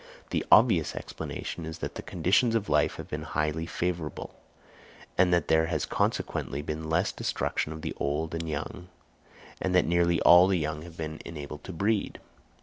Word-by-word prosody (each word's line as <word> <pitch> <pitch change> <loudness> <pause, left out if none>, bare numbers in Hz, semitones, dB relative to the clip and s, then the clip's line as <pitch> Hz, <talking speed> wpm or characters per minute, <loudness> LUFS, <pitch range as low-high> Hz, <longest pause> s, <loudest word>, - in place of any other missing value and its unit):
The - - 0
obvious - - +5
explanation 85 - -6
is 80 +1 -6
that - - -5
the - - -6
conditions 100 +7 +2
of 105 -2 0
life - - +2
have - - -8
been - - -4
highly 75 +2 -2
favourable, 85 -4 -3 0.8
and 90 -1 +4
that 85 -3 +2
there 80 0 +3
has 80 -2 -1
consequently 70 +2 -1
been 80 +1 -4
less 90 +5 +2
destruction 75 - -2
of 80 0 -8
the - - -3
old 75 +3 -1
and 80 -1 -3
young 80 +4 -5 0.7
and 95 -1 0
that 90 - +5
nearly 85 0 +2
all 90 +1 +8
the 95 -1 +2
young 75 -1 -2
have 85 0 -11
been 80 -1 -5
enabled 75 -2 -8
to - - -6
breed. 100 +4 -1
80 Hz, 175 wpm, -28 LUFS, 80-90 Hz, 0.8 s, all